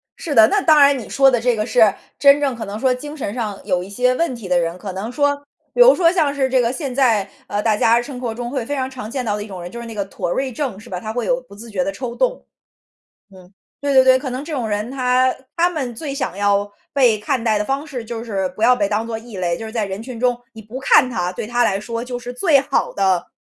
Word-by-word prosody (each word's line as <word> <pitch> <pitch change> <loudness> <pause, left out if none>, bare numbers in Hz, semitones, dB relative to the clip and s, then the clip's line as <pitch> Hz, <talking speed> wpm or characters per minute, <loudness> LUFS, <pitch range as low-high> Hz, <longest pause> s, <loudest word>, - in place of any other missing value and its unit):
是 300 -6 -4
的， 220 -1 +8
那 410 0 +1
当 310 -3 +5
然 280 -1 +6
你 225 - -9
说 270 -1 +4
的 245 - +2
这 240 0 +1
个 215 - -1
是， 220 -5 +4 0.3
真 280 0 +6
正 270 -4 0
可 225 - -6
能 205 +2 -6
说 260 0 +2
精 295 +4 -7
神 245 -9 -4
上 215 -5 -4
有 180 -3 0
一 190 - -10
些 250 +5 +1
问 330 -4 -1
题 225 -5 -9
的 180 -1 +2
人， 170 +1 -2
可 195 +1 -6
能 195 +6 -5
说 285 +2 +1 0.4
比 - - +3
如 - - +8
说 335 -2 +4
像 310 -6 +1
是 265 -2 +1
这 260 -1 +3
个 235 - +1
现 270 -3 -4
在， 225 -7 +2 0.2
呃， 205 0 -2
大 220 -2 +3
家 230 +2 +4
生 255 0 -8
活 240 -3 -3
中 240 0 -5
会 260 -4 -2
非 290 - -3
常 260 -1 -2
常 255 -5 -8
见 255 +1 -3
到 210 -2 0
的 205 - -5
一 - - -10
种 185 -4 -8
人， 175 - -8
就 235 - -7
是 235 - -7
那 225 - -8
个 205 - -1
妥 185 - -4
瑞 265 +7 -1
症 245 -5 -4
是 235 - -14
吧， 180 -1 -4
他 215 +3 -6
会 240 -1 -2
有 255 +2 0
不 250 -6 -16
自 230 +3 -11
觉 185 -3 0
的 - - -1
抽 250 -2 -5
动。 - - -1 0.9
嗯， 185 0 -16 0.3
对 285 -1 0
对 260 - +7
对， 260 0 +6
可 265 0 -5
能 255 +3 -4
这 320 - -6
种 245 -6 -2
人 210 +2 -2
他 255 -1 +2 0.2
他 345 +1 +4
们 270 -8 -4
最 275 +3 -5
想 260 -9 -3
要 205 0 +1 0.2
被 245 -6 +4
看 230 +3 -1
待 220 -2 +2
的 210 - -1
方 275 +4 -2
式 250 -6 -6
就 230 0 -5
是 195 -5 -2
不 215 - -3
要 250 +2 +6
被 205 -4 0
当 215 +2 -1
作 225 -1 -4
异 225 -2 -12
类， 175 -2 -1
就 225 - -7
是 220 - -7
在 220 -3 -1
人 195 +2 -5
群 245 0 -8
中， 245 0 +1 0.2
你 225 - -10
不 225 +5 -8
看 260 -1 +4
他， 180 -7 -2
对 185 - -5
他 240 +2 +1
来 195 - +1
说 230 +2 -5
就 245 0 -5
是 245 0 -7
最 285 +2 +3
好 275 0 -1
的， 190 -3 +1
240 Hz, 310 characters per minute, -20 LUFS, 210-265 Hz, 0.9 s, 的